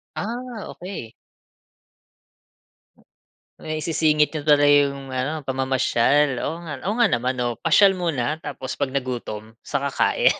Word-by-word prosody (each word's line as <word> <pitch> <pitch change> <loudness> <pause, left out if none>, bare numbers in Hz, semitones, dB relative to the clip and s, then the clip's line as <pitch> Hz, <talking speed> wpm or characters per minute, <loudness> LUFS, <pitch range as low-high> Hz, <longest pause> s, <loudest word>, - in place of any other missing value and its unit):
Ah, 235 0 -5
okey. 180 - -8 2.5
Maisisingit 155 -1 +1
niyo 155 - -3
pala 145 -1 +4
'yong 140 -2 +3
ano 140 +4 -2
pamamasyal, 130 0 +2
oo 165 - -3
nga, 145 -4 -6
oo 215 - -1
nga 240 - +5
naman. 125 - 0
Oo 120 -1 0
pasyal 200 -2 +5
muna, 160 -4 -2
tapos 130 -3 -6
'pag 140 -2 -2
nagutom, 120 -5 -4
sa 145 - -2
kakain. 140 -1 +2
145 Hz, 120 wpm, -23 LUFS, 130-160 Hz, 2.5 s, nga